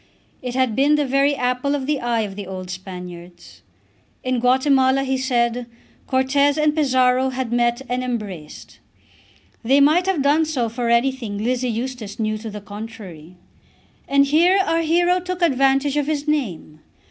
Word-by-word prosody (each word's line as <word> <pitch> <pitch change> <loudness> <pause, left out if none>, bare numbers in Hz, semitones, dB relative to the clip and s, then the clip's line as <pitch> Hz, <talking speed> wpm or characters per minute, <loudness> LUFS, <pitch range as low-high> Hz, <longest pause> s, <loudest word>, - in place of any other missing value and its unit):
It 250 -1 -5
had 255 -4 +1
been 285 +3 +3
the 295 -1 +1
very 275 +2 +2
apple 250 +2 -1
of 270 -2 -3
the 290 0 0
eye 235 -1 0
of 200 -3 -5
the 200 -2 -7
old 185 -1 -7
Spaniards. 180 - -10 0.6
In 255 -1 0
Guatemala, 260 +1 +3
he 265 0 -1
said, 245 -2 0 0.4
Cortez 280 +2 +2
and 305 0 +2
Pizarro 260 -3 +2
had 255 -2 -4
met 240 +1 +1
and 250 +1 -2
embraced. 205 -11 -6 0.8
They 265 +4 +3
might 310 +6 +4
have 355 -8 +1
done 300 +3 +3
so 260 -7 -1
for 235 +1 -3
anything 235 -3 0
Lizzie 250 +3 -1
Eustace 235 -2 -5
knew 215 -1 -1
to 220 +1 -7
the 210 0 -8
contrary. 205 -6 -10 0.7
And 280 0 +4
here 335 +7 +4
our 330 0 +1
hero 350 +3 +2
took 365 0 -4
advantage 275 -1 +2
of 290 -1 0
his 300 -1 -2
name. 200 - -2
255 Hz, 160 wpm, -21 LUFS, 225-280 Hz, 0.8 s, might